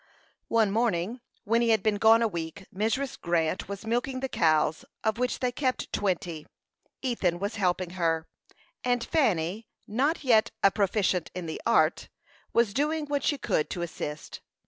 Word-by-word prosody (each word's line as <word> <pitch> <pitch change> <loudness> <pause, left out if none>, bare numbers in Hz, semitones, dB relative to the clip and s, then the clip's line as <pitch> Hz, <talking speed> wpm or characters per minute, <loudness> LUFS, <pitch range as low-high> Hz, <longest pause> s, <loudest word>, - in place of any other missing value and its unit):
One 225 -3 +3
morning, 225 0 0 0.2
when 230 +2 +2
he 235 - +2
had 220 -1 +3
been 215 -2 +2
gone 225 +2 +6
a - - +3
week, 170 0 -6
Mrs. 225 +7 -1
Grant 170 +1 0
was 200 +2 -6
milking 245 +3 -1
the 265 - -2
cows, 155 - +2 0.2
of 220 +1 0
which 250 +2 -1
they 250 -1 +1
kept 255 0 -2
twenty. 175 -5 -2 0.6
Ethan 200 -9 0
was 200 +4 -3
helping 180 -2 0
her, 165 -3 0 0.6
and 245 -1 +1
Fanny, 210 - 0 0.2
not 275 +11 0
yet 225 -5 +4
a 195 - +7
proficient 195 -3 +1
in 180 -2 -4
the 160 - -5
art, - - +3 0.4
was 235 -3 +2
doing 300 +2 0
what 285 -2 -1
she 290 - +1
could 155 - 0
to 175 - -3
assist. 150 -3 -6
215 Hz, 165 wpm, -28 LUFS, 175-245 Hz, 0.6 s, a